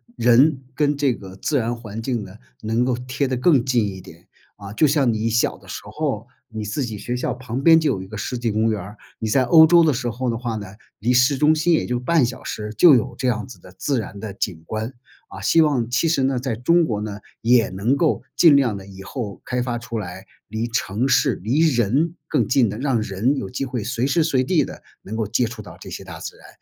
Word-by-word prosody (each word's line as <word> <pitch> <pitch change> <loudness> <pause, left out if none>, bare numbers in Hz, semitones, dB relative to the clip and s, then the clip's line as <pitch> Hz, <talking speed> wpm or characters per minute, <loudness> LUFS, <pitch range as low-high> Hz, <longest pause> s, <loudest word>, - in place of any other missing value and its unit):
人 130 +4 +4
跟 145 +1 +1
这 140 -3 +2
个 95 -4 -10
自 140 +9 -1
然 120 -1 -1
环 115 -2 -7
境 120 -2 -2
呢 95 +1 -11 0.2
能 115 +3 0
够 125 -1 0
贴 125 +3 -2
得 130 - -1
更 130 -1 +4
近 120 -5 +2
一 95 -2 -7
点。 85 -1 -15 0.3
啊， 100 -1 -9
就 150 +9 +3
像 140 -4 +2
你 110 +1 -1
小 115 +1 +1
的 - - -19
时 - - -6
候， 115 0 -3 0.2
你 110 -3 -6
自 105 +7 -2
己 110 -3 -6
学 120 +4 -4
校 125 - -2
旁 125 +1 -5
边 160 +2 +7
就 160 -3 +2
有 95 - -3
一 95 - -9
个 110 - -9
世 110 +5 -4
纪 120 -1 -1
公 110 +1 +2
园 105 - -2
儿， 100 +4 -10 0.2
你 110 - -2
在 130 +5 +3
欧 160 +6 +7
洲 170 +1 +6
的 160 - +4
时 125 -2 -2
候 125 +2 -3
的 115 - -1
话 120 -1 -3
呢， 105 -2 -6 0.3
离 115 +4 0
市 125 +3 +4
中 150 +3 +4
心 160 +2 +2
也 160 - +2
就 125 0 -2
半 145 +2 +2
小 120 0 -5
时 105 0 -5
就 160 0 +8
有 120 +1 -1
这 130 - -1
样 110 -3 0
子 125 - -12
的 95 - -15
自 140 +3 0
然 105 -2 -7
的 105 -1 -6
景 90 -5 -4
观。 110 +6 -4 0.3
啊， - - -10
希 165 - +3
望 135 -7 +1
其 135 +7 +1
实 155 -4 +1
呢， 130 -1 +1
在 125 -2 -2
中 170 +9 +3
国 105 -7 -2
呢 105 -1 -5 0.2
也 120 0 +4
能 105 +9 0
够 160 0 +1
尽 165 -4 +7
量 125 -7 +2
地 95 - -10
以 95 -1 -11
后 105 -1 -6
开 125 0 -2
发 120 -1 -2
出 120 0 -6
来 95 -1 -7 0.2
离 110 +2 -3
城 115 +2 -1
市、 130 - +3
离 120 +8 +1
人 150 - +2
更 125 -8 +1
近 125 -4 +3
的、 105 - -5
让 130 -3 0
人 110 +6 0
有 100 -8 -4
机 135 +4 -3
会 125 -4 -4
随 120 +2 -1
时 160 +4 +2
随 140 -5 +1
地 165 +3 +2
地 - - -9 0.2
能 110 +3 -6
够 110 -2 -1
接 120 +4 +1
触 115 -1 -7
到 - - -12
这 - - -9
些 - - -7
大 - - -8
自 - - -7
然， - - -16
120 Hz, 275 characters per minute, -22 LUFS, 110-135 Hz, 0.3 s, 就